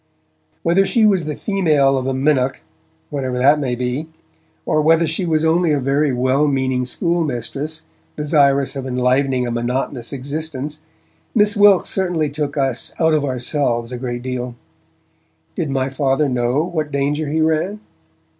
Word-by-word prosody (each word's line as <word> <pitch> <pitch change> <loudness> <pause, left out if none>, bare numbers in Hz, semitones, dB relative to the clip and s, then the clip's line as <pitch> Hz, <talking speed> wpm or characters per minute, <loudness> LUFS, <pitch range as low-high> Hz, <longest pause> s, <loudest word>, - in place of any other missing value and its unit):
Whether 175 +4 +3
she 220 +3 +2
was 190 -6 +3
the 150 -1 -3
female 155 -9 +2
of 130 -1 -2
a 135 - 0
minnock 135 -1 +1 0.5
(whatever 130 -3 -2
that 140 +4 +4
may 130 -4 -1
be) 125 +5 -3 0.6
or 155 - +2
whether 165 +2 +4
she 165 +3 -2
was 160 -1 +1
only 165 0 +2
a 145 - +2
very 140 +2 +1
well 130 +4 +2
meaning 130 -2 0
schoolmistress 155 - -2 0.3
desirous 140 -2 +2
of 135 -1 -4
enlivening 125 +1 +1
a 120 - -3
monotonous 120 +1 -2
existence, 145 +1 -5 0.6
Miss 210 -1 +4
Wilkes 205 -2 +5
certainly 175 -6 0
took 145 0 -3
us 135 -3 -1
out 160 -1 +3
of 150 -2 +2
ourselves 125 -2 -1
a 125 - -5
good 120 -1 -4
deal. 125 -1 -4 1.0
Did 160 -4 -2
my 135 -1 -1
Father 135 +2 +1
know 125 +3 0
what 160 -4 -3
danger 145 +2 -1
he 160 +2 0
ran? 160 +6 0
140 Hz, 155 wpm, -19 LUFS, 130-160 Hz, 1.0 s, Wilkes